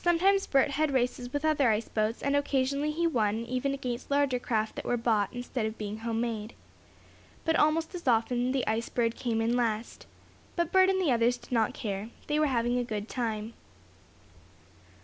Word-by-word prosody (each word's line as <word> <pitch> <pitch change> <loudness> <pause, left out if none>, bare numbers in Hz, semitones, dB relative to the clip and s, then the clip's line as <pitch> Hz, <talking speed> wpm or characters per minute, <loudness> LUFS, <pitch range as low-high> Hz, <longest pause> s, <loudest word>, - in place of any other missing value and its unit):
Sometimes 380 +3 +3
Bert 275 0 +3
had 285 0 0
races 245 -1 -1
with 290 +3 -2
other 290 -5 +3
ice 215 +1 0
boats, 215 +1 -1
and 280 +1 +1
occasionally 280 +1 +1
he 330 +3 0
won 225 -7 +1
even 255 +3 -1
against 255 -3 -4
larger 280 -3 +2
craft 220 -3 -1
that - - -5
were 245 - +1
bought, 220 -4 +1
instead 245 -2 -3
of 220 - -6
being 210 0 -5
home 225 0 -2
made. 225 -2 -3 0.9
But 325 - +2
almost 320 +3 +2
as 345 -5 -7
often 245 +1 +2
the 265 -2 0
Ice 220 +2 -1
Bird 230 -1 0
came 230 -2 -1
in 230 +2 +1
last. 230 -2 -2 0.5
But 340 -2 0
Bert 375 0 +5
and 380 0 +2
the 345 -7 +2
others 240 +1 +3
did - - -17
not 225 -3 +1
care. 205 0 -4 0.2
They 300 0 0
were 305 - +3
having 245 -1 +1
a - - 0
good 215 -3 -4
time. 225 -3 -3
245 Hz, 190 wpm, -29 LUFS, 225-285 Hz, 0.9 s, Bert